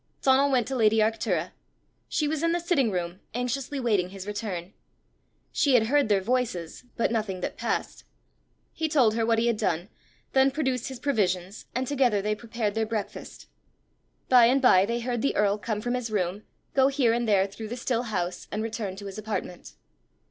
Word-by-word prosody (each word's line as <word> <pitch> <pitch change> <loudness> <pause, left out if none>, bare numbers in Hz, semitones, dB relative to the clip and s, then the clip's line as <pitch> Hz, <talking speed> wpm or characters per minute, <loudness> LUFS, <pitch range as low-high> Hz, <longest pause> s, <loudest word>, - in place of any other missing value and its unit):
Donal 270 +1 +4
went 250 -4 +2
to 270 - -2
lady 220 -2 +3
Arctura. 220 +1 +1 0.6
She 305 -3 0
was 305 0 -1
in 335 0 +2
the 345 - +1
sitting 330 -8 +1
room, 180 -1 -3 0.2
anxiously 255 +3 -2
waiting 205 -8 +1
his 195 0 -8
return. 205 -3 -5 0.8
She 285 -6 +3
had 220 -2 +5
heard 290 -6 +4
their 200 -2 +3
voices, 220 -7 -2
but 230 - +1
nothing 210 -5 -2
that - - -3
passed. - - -3 0.7
He 320 -1 -2
told 255 -8 +4
her 225 0 0
what 230 -1 +3
he 225 - +2
had 235 -2 +1
done; 175 0 -1 0.4
then 265 0 +5
produced 265 -4 -1
his 265 -2 -7
provisions, 195 -7 -1
and 255 +1 0
together 255 -6 +2
they 210 +2 0
prepared 220 -1 -3
their 220 0 -1
breakfast. 215 -2 -5 0.8
By 250 -2 +7
and 260 +3 +3
by 200 -7 +5
they 235 +1 -1
heard 240 -1 -2
the 275 - 0
earl 205 0 +2
come 210 -1 -3
from 245 +2 -2
his 250 -2 -2
room, 195 -1 -2 0.3
go 265 -1 +5
here 270 -4 +2
and 235 0 0
there 195 -3 +4
through 205 +3 -8
the 240 +3 -5
still 240 -1 0
house, 180 -3 -3
and 215 +1 -2
return 220 -4 -4
to 200 +1 -9
his 195 +1 -6
apartment. 210 -4 -5
225 Hz, 190 wpm, -27 LUFS, 205-255 Hz, 0.8 s, By